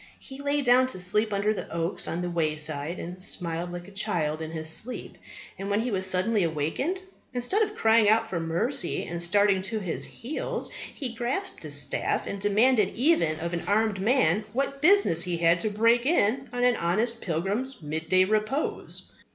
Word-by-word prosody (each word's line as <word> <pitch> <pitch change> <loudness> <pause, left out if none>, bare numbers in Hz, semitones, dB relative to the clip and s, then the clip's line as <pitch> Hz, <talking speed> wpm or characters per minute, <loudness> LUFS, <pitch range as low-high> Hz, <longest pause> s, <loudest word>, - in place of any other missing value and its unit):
He 270 0 -11
lay 285 0 0
down 255 +1 +5
to 255 - -4
sleep 210 +4 +1
under 205 +1 +1
the - - -7
oaks 170 +2 -1
on 175 +2 -3
the 175 - -2
wayside, 155 -1 -1
and 180 +2 -7
smiled 175 -2 0
like 175 0 -7
a - - -12
child 170 -7 -1
in 160 - -5
his 160 -1 -5
sleep. 225 +10 0 0.4
And, 195 +1 -4
when 205 +2 +1
he 245 +1 -2
was 190 -2 0
suddenly 200 +4 +1
awaked, 165 - -2 0.3
instead 245 - +1
of 420 -1 0
crying 225 - +4
out 225 +1 +3
for 185 -6 -3
mercy 170 - -1
and 170 0 -5
starting 195 +2 +3
to 220 +4 -2
his 180 -5 -3
heels, 265 +7 -5 0.2
he 255 -5 -5
grasped 250 +12 -3
his - - 0
staff - - -1
and 200 - -5
demanded 210 +1 +3
even 235 - +2
of 170 +1 -3
an 170 - -2
armed 205 -1 +1
man 215 -4 +2
what 275 +2 -2
business 350 - +5
he 175 -1 0
had 165 +1 +3
to 215 - -1
break 230 +4 +2
in 265 -4 +1
on 245 0 -2
an 245 -1 +3
honest 220 +7 0
pilgrim's 195 +8 -2
midday 160 +5 +1
repose! 215 +8 -2
205 Hz, 185 wpm, -27 LUFS, 170-245 Hz, 0.4 s, down